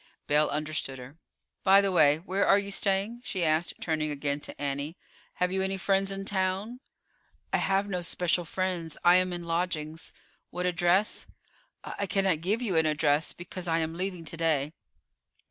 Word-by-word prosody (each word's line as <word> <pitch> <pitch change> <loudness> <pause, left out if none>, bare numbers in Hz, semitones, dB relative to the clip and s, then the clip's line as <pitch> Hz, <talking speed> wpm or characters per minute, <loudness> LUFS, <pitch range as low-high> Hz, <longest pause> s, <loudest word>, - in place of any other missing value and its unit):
Belle 150 +1 +3
understood 150 -3 -3
her. 130 +5 -12 0.4
"By 195 0 +6
the 200 -1 +1
way, 150 -4 +5
where 190 +4 -1
are 195 - +6
you 200 0 -3
staying?" 200 +4 0
she 185 -7 -2
asked, 155 +2 +1
turning 155 -2 -1
again 145 0 -2
to - - -8
Annie; 145 +4 -3 0.4
"have 180 0 0
you 190 0 0
any 190 0 -1
friends 195 0 +1
in 195 0 -5
town?" 195 +5 -1 0.7
"I - - +5
have 195 +1 +1
no 180 -3 -2
special 175 +1 0
friends. 170 -2 -3
I 175 +1 +7
am 185 0 +1
in 175 -1 -5
lodgings." 165 -2 -3 0.4
"What 180 0 -3
address?" 180 +3 +1 0.6
"I 200 - -4
cannot 190 -5 +1
give 210 +8 0
you 190 -8 0
an 160 -1 +3
address, 150 0 +2
because 180 +1 -7
I 165 -1 +2
am 160 0 -1
leaving 180 -1 -4
to 165 - -6
day." 155 -3 0
175 Hz, 175 wpm, -28 LUFS, 155-195 Hz, 0.7 s, I